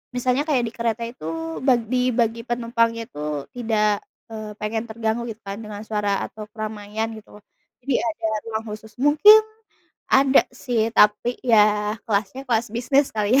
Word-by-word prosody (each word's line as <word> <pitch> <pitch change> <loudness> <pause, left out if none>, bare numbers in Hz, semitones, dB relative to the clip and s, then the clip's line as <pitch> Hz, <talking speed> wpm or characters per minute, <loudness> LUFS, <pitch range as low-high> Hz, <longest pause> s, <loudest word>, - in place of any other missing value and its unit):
misalnya 250 +3 +1
kayak 265 -5 +2
di - - -6
kereta 230 -1 -2
itu 165 -7 -5
bag 245 -4 +3
dibagi 240 -2 +1
penumpangnya 230 -1 0
tuh 150 -1 -5
tidak, 215 -3 +1 0.3
eee, 215 -1 -6
pengen 220 +2 -2
terganggu, 225 +1 -2
gitu 225 -1 -8
kan, 200 +2 -6
dengan 210 -2 -8
suara 205 -2 -1
atau 215 -1 -9
keramaian 215 0 -4
gitu, 210 -1 -14 0.4
jadi 270 -2 0
ada 220 0 -2 0.2
ruang 220 0 -3
khusus. 215 0 -11
Mungkin 370 +10 +8 0.7
ada 270 0 +5
sih, 235 -3 0
tapi 210 +4 +4
ya 210 -2 +4
kelasnya 205 +5 -1
kelas 230 -1 +1
bisnis 270 +4 +2
kali 215 +3 +2
ya. - - +7
225 Hz, 150 wpm, -23 LUFS, 210-240 Hz, 0.7 s, Mungkin